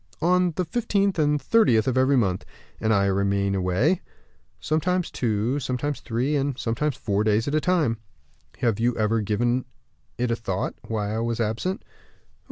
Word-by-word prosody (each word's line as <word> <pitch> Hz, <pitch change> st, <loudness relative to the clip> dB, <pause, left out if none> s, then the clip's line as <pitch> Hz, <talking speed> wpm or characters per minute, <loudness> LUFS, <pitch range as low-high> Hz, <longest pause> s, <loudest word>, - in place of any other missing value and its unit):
"On 180 Hz, +1 st, +3 dB
the 180 Hz, -, -1 dB
fifteenth 200 Hz, -2 st, 0 dB
and 150 Hz, -1 st, +2 dB
thirtieth 135 Hz, -, +3 dB
of 130 Hz, -, +1 dB
every 130 Hz, +1 st, +3 dB
month." 95 Hz, -6 st, +1 dB, 0.4 s
"And 110 Hz, -, +1 dB
I 100 Hz, -2 st, +3 dB
remain 100 Hz, 0 st, +1 dB
away?" 95 Hz, -, +1 dB, 0.6 s
"Sometimes 175 Hz, +3 st, 0 dB
two, 115 Hz, +3 st, 0 dB
sometimes 140 Hz, +2 st, -2 dB
three, 130 Hz, +5 st, -1 dB
and 140 Hz, -2 st, -1 dB
sometimes 130 Hz, +5 st, -1 dB
four 100 Hz, -1 st, 0 dB
days 110 Hz, +2 st, +2 dB
at 140 Hz, -, -1 dB
a 155 Hz, -, +2 dB
time." 155 Hz, -12 st, +1 dB, 0.6 s
"Have 115 Hz, -4 st, +1 dB
you 120 Hz, +1 st, +1 dB
ever 110 Hz, +1 st, +1 dB
given 120 Hz, +5 st, 0 dB, 0.5 s
it 120 Hz, 0 st, 0 dB
a -, -, +2 dB
thought, 95 Hz, -5 st, -3 dB
why 105 Hz, -2 st, -2 dB
I 110 Hz, -, -1 dB
was 115 Hz, 0 st, -2 dB
absent?" 115 Hz, -, -2 dB
120 Hz, 165 wpm, -25 LUFS, 110-150 Hz, 0.6 s, On